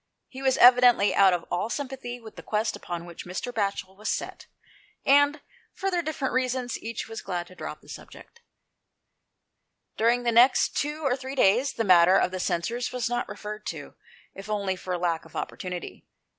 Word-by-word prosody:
He 265 Hz, -, -9 dB
was 265 Hz, -1 st, +2 dB
evidently 245 Hz, -4 st, +6 dB
out 195 Hz, -1 st, +6 dB
of 175 Hz, -2 st, -1 dB
all 180 Hz, +5 st, -1 dB
sympathy 260 Hz, -3 st, -5 dB
with 225 Hz, -2 st, -13 dB
the -, -, -9 dB
quest 215 Hz, 0 st, -1 dB
upon 175 Hz, -1 st, -6 dB
which 170 Hz, -1 st, -9 dB
Mr. 195 Hz, +7 st, -5 dB
Batchel 195 Hz, -3 st, -2 dB
was 215 Hz, +2 st, -5 dB
set, -, -, -4 dB, 0.6 s
and, 285 Hz, +1 st, +4 dB, 0.3 s
for 390 Hz, 0 st, -2 dB
their 350 Hz, -1 st, +1 dB
different 305 Hz, -6 st, -3 dB
reasons, 255 Hz, -1 st, -1 dB
each 230 Hz, 0 st, -5 dB
was 225 Hz, 0 st, -7 dB
glad 175 Hz, -2 st, -4 dB
to 185 Hz, -, -16 dB
drop -, -, -7 dB
the -, -, -21 dB
subject. 470 Hz, -, -12 dB, 1.6 s
During 235 Hz, +2 st, +2 dB
the 240 Hz, -, +1 dB
next 240 Hz, +3 st, +4 dB
two 300 Hz, +2 st, -2 dB
or 265 Hz, -3 st, +2 dB
three 265 Hz, +1 st, -7 dB
days, 255 Hz, +4 st, +3 dB
the 225 Hz, -, -1 dB
matter 180 Hz, -2 st, +6 dB
of -, -, +1 dB
the 185 Hz, -, -4 dB
censers 230 Hz, +9 st, -2 dB
was 250 Hz, -2 st, -2 dB
not 240 Hz, 0 st, -2 dB
referred 210 Hz, 0 st, -7 dB
to, -, -, -6 dB, 0.4 s
if 195 Hz, +2 st, -10 dB
only 200 Hz, -3 st, -1 dB
for 180 Hz, 0 st, -4 dB
lack 170 Hz, -2 st, -1 dB
of 165 Hz, -, -17 dB
opportunity. 180 Hz, -2 st, -6 dB
225 Hz, 185 wpm, -26 LUFS, 185-255 Hz, 1.6 s, evidently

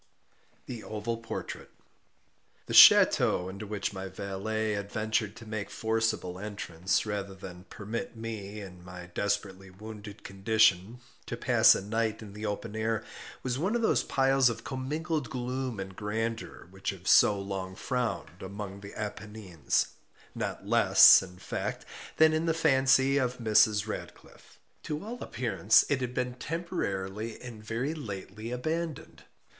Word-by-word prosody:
THE 120 Hz, -3 st, -7 dB
OVAL 110 Hz, +2 st, -3 dB
PORTRAIT 115 Hz, -1 st, -6 dB, 1.0 s
The -, -, -5 dB
ch√¢teau 90 Hz, -, +7 dB
into 100 Hz, +2 st, -8 dB
which 100 Hz, -1 st, -3 dB
my 95 Hz, 0 st, -5 dB
valet 100 Hz, +3 st, -3 dB
had 100 Hz, -1 st, -4 dB
ventured 110 Hz, -1 st, -1 dB
to 115 Hz, 0 st, -11 dB
make 110 Hz, -2 st, -4 dB
forcible 110 Hz, -5 st, -1 dB
entrance, 95 Hz, -3 st, -2 dB
rather 100 Hz, -2 st, -4 dB
than 90 Hz, -1 st, -10 dB
permit 110 Hz, +3 st, -6 dB
me, 110 Hz, -2 st, -6 dB
in 90 Hz, -3 st, -11 dB
my 90 Hz, -1 st, -10 dB
desperately 100 Hz, -1 st, -2 dB
wounded 105 Hz, +2 st, -10 dB
condition, 100 Hz, +2 st, +2 dB, 0.3 s
to -, -, -4 dB
pass -, -, +5 dB
a -, -, -4 dB
night 110 Hz, +1 st, -1 dB
in 100 Hz, -2 st, -11 dB
the 105 Hz, +1 st, -5 dB
open 105 Hz, +1 st, -4 dB
air, 110 Hz, 0 st, -1 dB, 0.4 s
was 125 Hz, 0 st, -2 dB
one 190 Hz, +8 st, 0 dB
of 235 Hz, -, 0 dB
those -, -, +3 dB
piles 135 Hz, -1 st, +3 dB
of 115 Hz, 0 st, -5 dB
commingled 150 Hz, +2 st, -3 dB
gloom 125 Hz, -2 st, -3 dB
and 95 Hz, -1 st, -6 dB
grandeur 110 Hz, 0 st, -4 dB
which 95 Hz, 0 st, -4 dB
have 95 Hz, -1 st, -7 dB
so 100 Hz, -1 st, +6 dB
long 95 Hz, -1 st, -5 dB
frowned 120 Hz, -6 st, -3 dB
among 100 Hz, +1 st, -7 dB
the 100 Hz, 0 st, -11 dB
Appennines, 105 Hz, -6 st, -2 dB, 0.4 s
not -, -, -4 dB
less -, -, +8 dB
in 90 Hz, -1 st, -11 dB
fact 100 Hz, -, -4 dB, 0.3 s
than 160 Hz, 0 st, +6 dB
in 160 Hz, +1 st, 0 dB
the 165 Hz, -, +2 dB
fancy 135 Hz, -3 st, +4 dB
of 125 Hz, -1 st, -1 dB
Mrs. 110 Hz, -2 st, +3 dB
Radcliffe. 110 Hz, -, -9 dB, 0.2 s
To 150 Hz, +5 st, -5 dB
all 240 Hz, +2 st, -7 dB
appearance 110 Hz, -3 st, +3 dB
it 140 Hz, -2 st, +1 dB
had 125 Hz, 0 st, -3 dB
been 125 Hz, -1 st, -1 dB
temporarily 115 Hz, -, -4 dB
and 115 Hz, -4 st, -10 dB
very 120 Hz, +7 st, -2 dB
lately 110 Hz, -5 st, -7 dB
abandoned. 155 Hz, +5 st, -4 dB
110 Hz, 145 wpm, -29 LUFS, 100-125 Hz, 1.0 s, less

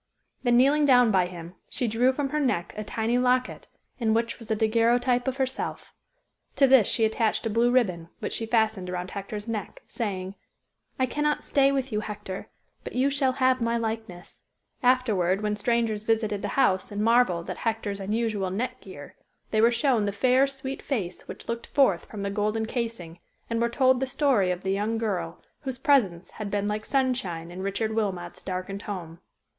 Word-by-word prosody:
Then 240 Hz, -2 st, +3 dB
kneeling 285 Hz, +4 st, +4 dB
down 245 Hz, -4 st, +6 dB
by 185 Hz, -3 st, +3 dB
him, 175 Hz, -1 st, -9 dB, 0.2 s
she 250 Hz, -, -2 dB
drew 235 Hz, +4 st, +3 dB
from 275 Hz, +1 st, -2 dB
her 300 Hz, -, -1 dB
neck 250 Hz, -12 st, 0 dB
a 215 Hz, -, -4 dB
tiny 225 Hz, +3 st, 0 dB
locket, 255 Hz, 0 st, +1 dB, 0.3 s
in 220 Hz, -2 st, +2 dB
which 230 Hz, +1 st, -1 dB
was 230 Hz, -, -11 dB
a 220 Hz, -, +2 dB
daguerreotype 240 Hz, +3 st, +2 dB
of 265 Hz, 0 st, -1 dB
herself. 265 Hz, -1 st, -3 dB, 0.6 s
To 275 Hz, -, +5 dB
this 260 Hz, -6 st, +6 dB
she 225 Hz, -, +2 dB
attached 220 Hz, +1 st, 0 dB
a 225 Hz, -, 0 dB
blue 230 Hz, +3 st, +3 dB
ribbon, 185 Hz, -10 st, +1 dB
which -, -, -4 dB
she 225 Hz, -, -3 dB
fastened 220 Hz, -5 st, +1 dB
around 180 Hz, 0 st, -4 dB
Hector's 205 Hz, +2 st, -6 dB
neck, 215 Hz, -4 st, -5 dB
saying, 190 Hz, -4 st, -4 dB, 0.6 s
"I 260 Hz, -, +2 dB
cannot 295 Hz, +3 st, -1 dB
stay 275 Hz, -1 st, +3 dB
with 270 Hz, -1 st, -1 dB
you, 210 Hz, -, 0 dB
Hector, 205 Hz, -3 st, -6 dB, 0.4 s
but -, -, -7 dB
you 265 Hz, +3 st, +2 dB
shall 270 Hz, -2 st, +2 dB
have 255 Hz, -1 st, +2 dB
my 230 Hz, 0 st, +1 dB
likeness." 220 Hz, -6 st, -5 dB, 0.4 s
Afterward 215 Hz, -7 st, +2 dB
when 210 Hz, 0 st, 0 dB
strangers 225 Hz, 0 st, 0 dB
visited 215 Hz, -2 st, 0 dB
the -, -, -2 dB
house 190 Hz, -9 st, +2 dB
and 205 Hz, +1 st, -2 dB
marvelled 225 Hz, -7 st, +3 dB
at -, -, -4 dB
Hector's 220 Hz, -3 st, -2 dB
unusual 210 Hz, -1 st, -1 dB
neck 220 Hz, +8 st, -3 dB
gear, -, -, -11 dB, 0.4 s
they 215 Hz, -, +3 dB
were 230 Hz, -, +6 dB
shown 240 Hz, -3 st, +2 dB
the 200 Hz, -, 0 dB
fair, 255 Hz, +6 st, +3 dB
sweet 270 Hz, 0 st, -6 dB
face, 190 Hz, -10 st, -4 dB
which -, -, -9 dB
looked 235 Hz, 0 st, -4 dB
forth 260 Hz, -12 st, +2 dB
from 205 Hz, -2 st, -7 dB
the 200 Hz, -, -2 dB
golden 215 Hz, +2 st, 0 dB
casing, 225 Hz, -8 st, -4 dB, 0.3 s
and 230 Hz, 0 st, 0 dB
were 235 Hz, -, +2 dB
told 260 Hz, +1 st, +3 dB
the 265 Hz, -, -1 dB
story 255 Hz, -8 st, +2 dB
of 180 Hz, 0 st, -2 dB
the 190 Hz, -, 0 dB
young 210 Hz, +3 st, 0 dB
girl, 185 Hz, -7 st, -3 dB, 0.2 s
whose 265 Hz, -4 st, -4 dB
presence 195 Hz, -11 st, +2 dB
had 215 Hz, -2 st, -6 dB
been 205 Hz, 0 st, -1 dB
like 210 Hz, +1 st, -2 dB
Sunshine 220 Hz, -12 st, -1 dB
in 180 Hz, +2 st, -7 dB
Richard 205 Hz, +3 st, -2 dB
Wilmot's 190 Hz, -6 st, -2 dB
darkened 185 Hz, +2 st, -4 dB
home. 170 Hz, -5 st, -6 dB
225 Hz, 190 wpm, -26 LUFS, 200-250 Hz, 0.6 s, down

